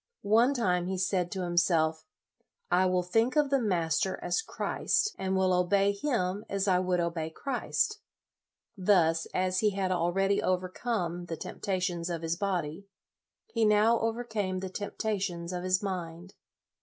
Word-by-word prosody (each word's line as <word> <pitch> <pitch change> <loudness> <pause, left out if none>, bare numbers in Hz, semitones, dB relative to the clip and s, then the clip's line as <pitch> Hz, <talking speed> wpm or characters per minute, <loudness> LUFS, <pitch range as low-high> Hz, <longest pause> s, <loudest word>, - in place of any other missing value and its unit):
One 230 +7 +4
time, 180 -7 +1
he 190 0 -2
said 180 -1 0
to 190 -2 -3
himself, 165 -2 +1 0.3
" - - -43 0.3
I 185 +1 +4
will 180 0 +1
think 225 - +1
of 295 -2 +2
the 275 -2 +3
master 185 -2 0
as - - 0
Christ, 425 -1 -1
and 190 0 -1
will 185 -1 +3
obey 195 +3 +3
him 200 -4 -1
as 200 0 -1
I 180 -2 +4
would 180 -1 0
obey 165 -2 -2
Christ." 275 - -1 0.8
Thus, 175 -5 +3
as 185 0 0
he 210 -1 +1
had 190 -2 0
already 190 +3 +1
overcome 180 -1 -2
the 165 -2 -5
tempta 190 +3 -3
tions 175 -1 -2
of 170 -1 -4
his 165 +1 0
body, 180 -1 -3 0.6
he 230 - -1
now 215 +2 +4
overcame 220 -5 -2
the 190 - -4
temptations 195 -4 -3
of 180 0 -3
his 185 +2 +1
mind. 180 -1 -5
185 Hz, 155 wpm, -29 LUFS, 175-205 Hz, 0.8 s, One